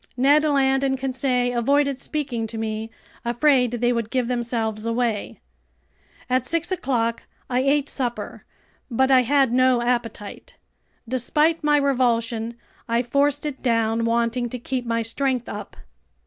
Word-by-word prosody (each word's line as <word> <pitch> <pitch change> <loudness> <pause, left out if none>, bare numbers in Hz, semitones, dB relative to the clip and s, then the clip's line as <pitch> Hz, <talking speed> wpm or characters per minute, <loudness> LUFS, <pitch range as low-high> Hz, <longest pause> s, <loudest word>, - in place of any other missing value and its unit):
Ned 285 +4 +4
Land 270 -2 +2
and 265 -1 +1
Conseil 255 -2 -1
avoided 280 +2 +2
speaking 270 -7 -3
to 225 - -6
me, 220 0 -3 0.3
afraid 250 0 +2
they 240 +1 +1
would 230 -2 -2
give 255 -1 0
themselves 230 -3 -2
away. 230 -2 -1 0.9
At 255 -1 +1
six 335 +6 -1
o'clock 240 -9 -1 0.2
I 250 - +2
ate 275 +2 +2
supper, 245 -4 -4 0.5
but 265 +2 +2
I 260 -1 +7
had 270 0 +2
no 255 -1 +3
appetite. 235 -4 -3 0.5
Despite 300 +7 +1
my 295 0 +4
revulsion, 235 -4 0 0.3
I 235 +1 +2
forced 280 +4 +1
it 290 -3 -5
down, 230 -2 +1
wanting 235 +1 0
to 250 - -5
keep 250 0 -4
my 230 0 0
strength 250 +2 -1
up. - - -8
250 Hz, 140 wpm, -23 LUFS, 230-275 Hz, 0.9 s, I